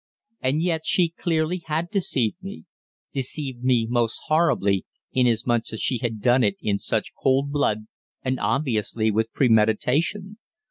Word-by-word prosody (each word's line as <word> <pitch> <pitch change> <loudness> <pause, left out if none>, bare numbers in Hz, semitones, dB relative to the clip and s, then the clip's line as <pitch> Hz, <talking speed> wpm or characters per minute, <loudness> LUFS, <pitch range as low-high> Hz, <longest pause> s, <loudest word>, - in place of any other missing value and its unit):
And 140 +5 +1
yet 165 -3 0
she 175 0 +2
clearly 165 +1 -1
had 160 +3 -2
deceived 135 - 0
me, 195 +2 -8 0.5
deceived 130 -1 -4
me 125 -3 +3
most 120 -1 0
horribly, 105 - +2 0.3
inasmuch 120 -2 +1
as 110 - -4
she 125 - 0
had 115 -3 -3
done 125 +3 +4
it 100 -2 +2
in 100 -1 -1
such - - -2
cold 135 +2 +2
blood 110 -7 0 0.4
and 130 0 -1
obviously 110 -2 0
with 110 +2 0
premeditation. 135 - +1
130 Hz, 140 wpm, -24 LUFS, 115-155 Hz, 0.5 s, done